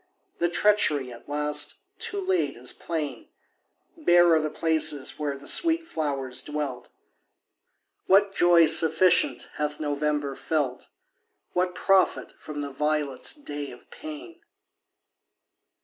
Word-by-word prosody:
The 175 - +1
treachery, 170 -9 +2
at 120 +4 -15
last, 150 0 0 0.2
too 450 -3 -2
late, 375 -1 0
is - - -6
plain; 150 -7 -5 0.7
Bare 175 - +4
are 160 - +4
the 155 - -2
places 155 -4 0
where 145 -2 -2
the 140 - -14
sweet 330 - +3
flowers 140 - -2
dwelt. 145 -5 -5 1.2
What 195 +1 +4
joy 175 -3 +5
sufficient 160 +3 +3
hath 150 0 -2
November 145 -1 -1
felt? 140 -3 -2 0.7
What 180 0 0
profit 190 0 +2
from 150 -1 -6
the 140 -1 -5
violet's 150 -1 -1
day 145 - -6
of - - -15
pain? 320 +3 -9
155 Hz, 115 wpm, -26 LUFS, 145-180 Hz, 1.2 s, joy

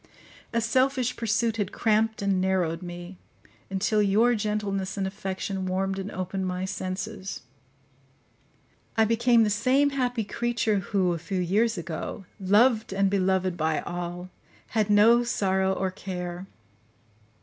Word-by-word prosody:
A 230 - +1
selfish 255 +2 +1
pursuit 225 0 0
had 205 -3 -1
cramped 220 -1 +1
and 195 -2 +1
narrowed 185 -3 0
me, 175 +1 -8 0.5
until 205 +2 +1
your 215 +4 +4
gentleness 205 -3 -2
and 195 - 0
affection 190 -1 -4
warmed 195 +1 -1
and 195 +1 -4
opened 185 0 -3
my 180 0 -2
senses; 190 +1 -5 1.5
I 220 - +5
became 230 +1 +4
the 210 - +1
same 265 +7 +3
happy 250 -4 -1
creature 230 -1 0
who, 185 -1 0
a 170 - -4
few 180 +4 -3
years 205 +5 +1
ago, 170 +3 -5
loved 215 +4 +3
and 195 0 +2
beloved 190 -2 +1
by 160 -2 0
all, 175 +1 -5 0.4
had 215 -2 0
no 225 +4 +6
sorrow 190 -5 +1
or 190 0 -1
care. 180 -1 -6
195 Hz, 135 wpm, -26 LUFS, 185-225 Hz, 1.5 s, no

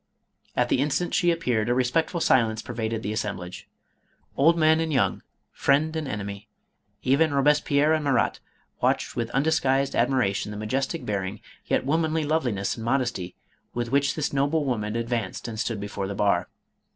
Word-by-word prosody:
At - - +1
the - - +2
instant 150 +5 0
she 175 -1 +3
ap 165 0 -2
peared 115 -4 0
a 120 - +2
respectful 130 +7 +1
silence 115 -8 +2
pervaded 115 -2 -3
the 105 - -2
assemblage. 95 -4 -5 0.7
Old 165 +4 +4
men 160 0 +4
and 165 -1 -1
young, 135 - +1 0.3
friend 155 +3 +1
and 155 -2 -2
enemy, 100 -2 -5 0.5
even 140 +3 +3
Robes 145 +1 +4
pierre 145 +2 +2
and 155 -1 +1
Marat, 140 -2 +1 0.4
watched - - +1
with 115 -1 -2
undisguised 135 -1 +1
admira 125 -5 +2
tion 100 - -3
the 105 - -6
majestic 130 +9 -2
bearing, 100 0 -3 0.3
yet - - +1
womanly 160 +2 +1
loveliness 125 -11 0
and 115 - -6
modesty, 120 -7 -1 0.4
with 120 0 -2
which 140 0 +2
this 150 -2 -2
noble 145 +3 +1
woman 110 -4 -2
advanced 115 -4 -2
and 110 -2 -6
stood 115 -2 -2
before 100 -1 -4
the 100 - -4
bar. 100 -3 +1
130 Hz, 170 wpm, -25 LUFS, 110-150 Hz, 0.7 s, Old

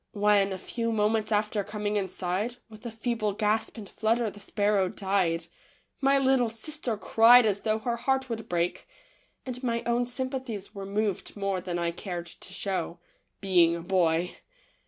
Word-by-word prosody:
When, 205 -1 +3
a 190 - -3
few 230 +4 -3
moments 215 0 +1
after 210 0 +1
coming 210 0 -3
inside, 190 +3 -2
with 220 +2 -9
a - - -3
feeble 225 -2 -2
gasp 215 +3 0
and 210 -3 -8
flutter 225 +2 0
the 205 - -13
sparrow 205 -2 +1
died, 190 -5 0 0.5
my 275 0 +4
little 265 -3 +3
sister 235 +1 -3
cried 230 +3 +6
as 205 -2 +1
though 215 0 0
her 235 +2 -2
heart 265 +2 0
would 225 -2 -5
break, 175 0 -1 0.6
and 250 -1 -5
my 235 -2 -1
own 240 +1 +1
sympathies 255 -5 -4
were 195 -1 -6
moved 205 0 -2
more 195 -2 -1
than 175 -1 -3
I 170 0 0
cared 175 0 -5
to 170 - -11
show, 185 -3 -2 0.4
being 175 -4 +4
a 170 - -5
boy. 175 -1 +1
210 Hz, 165 wpm, -28 LUFS, 190-235 Hz, 0.6 s, cried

